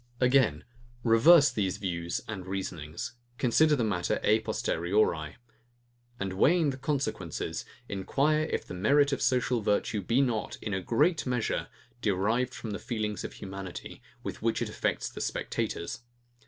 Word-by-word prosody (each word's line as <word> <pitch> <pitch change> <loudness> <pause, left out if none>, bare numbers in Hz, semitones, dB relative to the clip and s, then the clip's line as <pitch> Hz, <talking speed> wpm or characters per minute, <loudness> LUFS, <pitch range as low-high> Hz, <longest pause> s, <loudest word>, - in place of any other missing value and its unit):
Again; 125 - +3 0.4
reverse 140 +6 +7
these 100 -6 -1
views 85 -3 -3
and 95 -4 -6
reasonings: 85 -4 -4 0.2
Consider 150 +6 +4
the 125 - 0
matter 100 -5 0
a 110 +1 +4
posteriori; 85 -6 0 0.8
and 95 -1 -2
weighing 155 - +4
the 130 - -7
consequences, 130 - -2 0.2
enquire 140 +11 +1
if - - -2
the - - -8
merit 140 +10 +3
of 140 - -2
social 125 -1 +2
virtue 105 0 0
be 115 +7 +1
not, 120 -6 0
in 105 - -4
a 95 - -1
great 130 - +2
measure, 125 -3 -1 0.3
derived 110 +6 +1
from 110 - -6
the 105 - -4
feelings 110 -5 -3
of - - -6
humanity, 95 -2 -8 0.2
with - - -5
which - - +1
it - - -2
affects - - -1
the - - -7
spectators. 85 - -3
110 Hz, 145 wpm, -29 LUFS, 95-130 Hz, 0.8 s, reverse